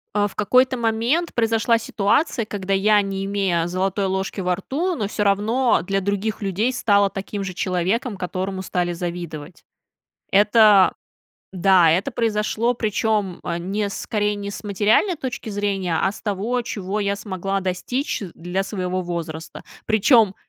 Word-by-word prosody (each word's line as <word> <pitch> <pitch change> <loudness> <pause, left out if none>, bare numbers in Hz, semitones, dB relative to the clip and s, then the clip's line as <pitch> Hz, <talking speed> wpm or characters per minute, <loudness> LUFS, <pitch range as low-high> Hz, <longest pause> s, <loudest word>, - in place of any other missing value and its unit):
А, 205 0 +3
в 200 - -13
какой-то 255 +5 +3
момент 235 +8 0
произошла 230 0 +2
ситуация, 230 +3 0
когда 195 -2 -3
я, 205 +2 +4
не 195 -1 -3
имея 195 -4 0
золотой 190 +2 -1
ложки 190 +1 -2
во 180 -1 +1
рту, 320 - -2
но 215 -8 -2
всё 210 0 -2
равно 220 +6 +2
для 195 +2 -1
других 200 +3 -2
людей 205 +6 0
стала 200 -5 +3
таким 195 +1 -5
же 185 - -5
человеком, 190 +6 -1
которому 185 +1 -3
стали 175 -2 -1
завидовать. 170 -2 -6 0.7
Это 205 -1 +6 0.6
Да, 185 -2 +5
это 185 +11 +1
произошло, 225 +1 0
причем, 215 -4 -1
э, 170 -1 -2
не 200 +4 -2
скорее 210 +1 -1
не 200 0 -5
с 195 - -7
материальной 210 - +2
точки 255 -5 -6
зрения, 200 -4 -1
а 190 - +2
с 215 - -12
того, 215 +4 -1
чего 205 -2 -3
я 200 0 0
смогла 195 -1 -3
достичь 190 +11 -2
для 175 +3 -3
своего 185 -2 -3
возраста. 165 -2 -6 0.2
Причем 220 -2 +4
200 Hz, 150 wpm, -22 LUFS, 185-220 Hz, 0.7 s, Это